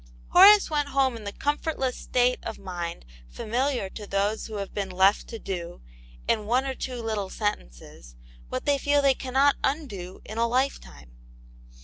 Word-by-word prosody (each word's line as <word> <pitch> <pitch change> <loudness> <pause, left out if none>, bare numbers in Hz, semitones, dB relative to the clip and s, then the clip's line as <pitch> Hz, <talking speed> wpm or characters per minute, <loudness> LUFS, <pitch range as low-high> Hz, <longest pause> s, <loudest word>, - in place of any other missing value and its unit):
Horace 400 +3 +8
went 295 -2 0
home 265 -3 +3
in 220 -2 -9
the 200 - -3
comfortless 290 -1 -2
state 250 0 +1
of 225 - -6
mind 175 - -6 0.2
familiar 245 - -1
to 210 -2 -8
those 200 +2 -1
who 220 - -7
have 200 -1 -5
been 200 -2 -3
left 190 +2 +3
to 230 - -7
do, 175 -5 -6 0.5
in 210 -1 0
one 250 +4 +2
or 270 - -2
two 255 -1 -5
little 210 -4 -2
sentences, - - -5 0.3
what - - -4
they 285 -1 +2
feel 285 +1 +2
they 275 -1 +5
cannot 270 +2 +2
undo 205 - -3
in 215 +2 -6
a 235 - +3
lifetime. 235 - -2
230 Hz, 165 wpm, -26 LUFS, 195-270 Hz, 0.5 s, Horace